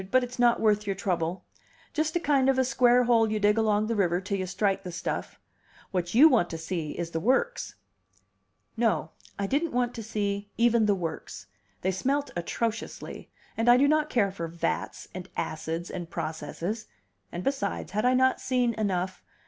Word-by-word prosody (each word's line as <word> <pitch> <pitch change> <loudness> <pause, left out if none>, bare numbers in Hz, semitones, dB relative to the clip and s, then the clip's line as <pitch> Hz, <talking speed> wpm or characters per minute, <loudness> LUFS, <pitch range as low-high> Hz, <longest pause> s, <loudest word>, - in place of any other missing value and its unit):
"But 255 +2 +4
it's 245 0 -7
not 240 -1 +4
worth 210 -1 +2
your 195 - 0
trouble. 180 -2 -2 0.5
Just 310 0 -1
a - - +3
kind 280 -4 +3
of 265 - +3
a 260 - +3
square 250 -1 +4
hole 230 -2 +3
you 215 - 0
dig 210 0 +4
along 215 -1 +2
the 230 +1 -1
river 180 -4 +2
till 195 +1 -3
you 185 - -2
strike 195 +1 0
the 180 -2 -7
stuff. 170 - -4 0.5
What 180 0 -2
you 285 +7 +9
want 240 - +3
to 165 - -4
see 160 -2 -4
is 170 -1 -3
the 165 - -1
works." 265 - 0 1.0
No, 225 -1 +1 0.3
I 200 - -1
didn't 290 +8 0
want 245 0 +1
to 230 - -6
see 205 -2 -2
even 235 -2 +4
the 205 - +3
works; 165 -9 -5 0.4
they 190 - +1
smelt 275 +10 -1
atrociously, 225 +6 -4 0.3
and 225 +2 +2
I 240 - +8
do 280 +2 +4
not 305 0 +2
care 200 -5 +2
for 170 -3 -5
vats, 170 +1 -3
and 185 +1 -7
acids, 160 +2 -3
and 175 -3 -6
processes: 170 +9 -4 0.4
and 175 - -5
besides, 270 -6 -2
had 210 +1 0
I 250 +1 +4
not 260 0 +3
seen 250 -2 +1
enough? 190 -4 -2
210 Hz, 190 wpm, -27 LUFS, 180-245 Hz, 1.0 s, you